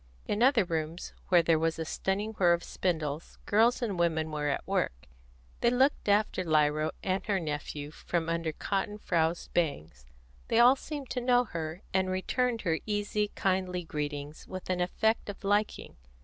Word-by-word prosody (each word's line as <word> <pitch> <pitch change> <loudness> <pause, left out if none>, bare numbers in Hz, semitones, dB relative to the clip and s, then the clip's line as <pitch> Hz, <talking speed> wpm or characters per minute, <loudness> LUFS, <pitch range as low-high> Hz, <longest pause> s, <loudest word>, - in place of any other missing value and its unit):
In 210 - -1
other 250 -3 +5
rooms, 165 0 -3
where 175 -2 +5
there 165 -1 +3
was 165 0 0
a 160 - -3
stunning 200 +6 -2
whir 175 -2 +6
of 170 - -1
spindles, 160 -4 -3
girls 230 +4 +3
and 200 -6 -2
women 160 -2 +1
were 150 -1 -2
at 140 - -2
work; - - -1 0.5
they 235 - +4
looked 260 -2 +2
after 205 -2 +2
Lyra 155 -1 +2
and 190 0 0
her 200 -2 +2
nephew 150 -2 -4
from 165 +1 -2
under 165 -1 -1
cotton 200 +5 -2
frowsed 170 -4 -1
bangs; 80 - -2 0.4
they - - +1
all 245 +3 +7
seemed 285 -1 -7
to 250 - -1
know 245 0 +4
her, 165 -4 -5
and 190 0 +2
returned 230 +5 0
her 165 -4 0
easy, 210 0 0
kindly 185 -2 0
greetings 150 -1 -5
with 185 0 -5
an 180 -1 0
effect 220 +5 +1
of 205 - -8
liking. 205 - 0
180 Hz, 170 wpm, -30 LUFS, 160-210 Hz, 0.5 s, all